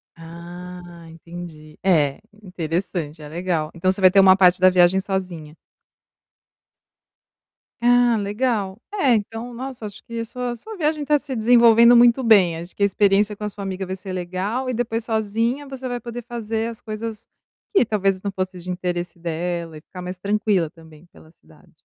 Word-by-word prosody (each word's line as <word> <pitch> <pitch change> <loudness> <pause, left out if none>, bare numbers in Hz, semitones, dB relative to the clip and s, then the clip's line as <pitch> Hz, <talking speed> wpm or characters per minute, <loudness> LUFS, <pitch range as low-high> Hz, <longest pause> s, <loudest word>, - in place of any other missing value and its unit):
Ah, 175 +1 -10
entendi, 165 -2 -11
é, 155 -7 +2 0.2
interessante, 170 -3 -4
é 150 - -9
legal. 165 -1 -2
Então, 175 +2 0
você 190 - -3
vai 185 -1 +7
ter 195 - +5
uma 190 -1 +7
parte 185 -1 +4
da 185 +1 +7
viagem 180 +1 +4
sozinha. 180 -6 -4 2.2
Ah, 245 -1 +4
legal, 205 -1 -1
é 280 - +3
então, 225 +3 -4
nossa, 255 -1 -7
acho 205 -1 -9 0.2
sua 245 +1 -4
sua 435 - -10
viagem 305 -2 0
tá 295 +1 +3
se 280 -2 -6
desenvolvendo 235 0 +6
muito 240 +2 +5
bem, 200 -7 +5
acho 170 +2 -9
que 200 - -1
a - - +7
experiência 205 +1 +2
com 210 - -9
a 210 - -1
sua 205 0 -8
amiga 190 0 -4
vai 185 +1 -4
ser 190 0 -8
legal 185 +8 -3
e - - -1
depois 230 -1 -2
sozinha 225 +5 -1
você 265 -1 -6
vai 245 -1 -3
poder 240 +1 -7
fazer 225 -1 -3
as 230 - -10
coisas 215 0 -6 0.5
que 390 - +4
talvez 195 -3 0
não 200 - -3
fosse 185 -1 -4
de 180 +1 -9
interesse 180 -1 -3
dela 170 -1 -4
e - - -12
ficar 180 +3 -11
mais 180 +1 -6
tranquila 200 -3 +1
também 160 0 -17
pela 160 - -18
cidade. - - -23
195 Hz, 175 wpm, -22 LUFS, 175-230 Hz, 2.2 s, vai